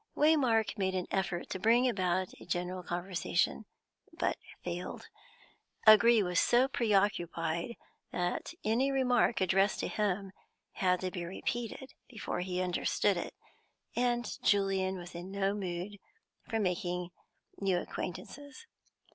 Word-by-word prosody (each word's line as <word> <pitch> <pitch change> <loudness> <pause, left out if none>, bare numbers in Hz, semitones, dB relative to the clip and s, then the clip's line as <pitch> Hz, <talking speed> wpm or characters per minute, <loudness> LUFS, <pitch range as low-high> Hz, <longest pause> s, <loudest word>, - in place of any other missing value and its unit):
Waymark 255 -9 +3
made 190 -1 0
an 185 - -1
effort 190 -3 -1
to 185 - -3
bring 235 +5 +4
about 185 -4 0
a - - -10
general 180 +1 -2
conversation, 175 +3 -1 0.5
but - - -1 0.3
failed; 175 0 -5 0.8
O'Gree 220 +1 +8
was 180 -2 +1
so 245 +2 +4
preoccupied 195 - 0 0.4
that 175 0 -2
any 245 +6 +2
remark 250 -4 +2
addressed 195 +2 +3
to - - -1
him 200 -2 -1 0.4
had 180 -1 +1
to 185 -1 -2
be 175 - -4
repeated 235 +8 -4 0.2
before 225 -5 -4
he 180 0 -1
understood 185 +2 +1
it, 175 - -5 0.6
and 240 0 0
Julian 195 -2 +2
was 175 0 -9
in 175 +2 -7
no 195 0 0
mood 190 0 -4 0.5
for 225 - 0
making 180 -2 -1 0.5
new 195 -2 +2
acquaintances. 280 - -6
195 Hz, 125 wpm, -32 LUFS, 180-225 Hz, 0.8 s, O'Gree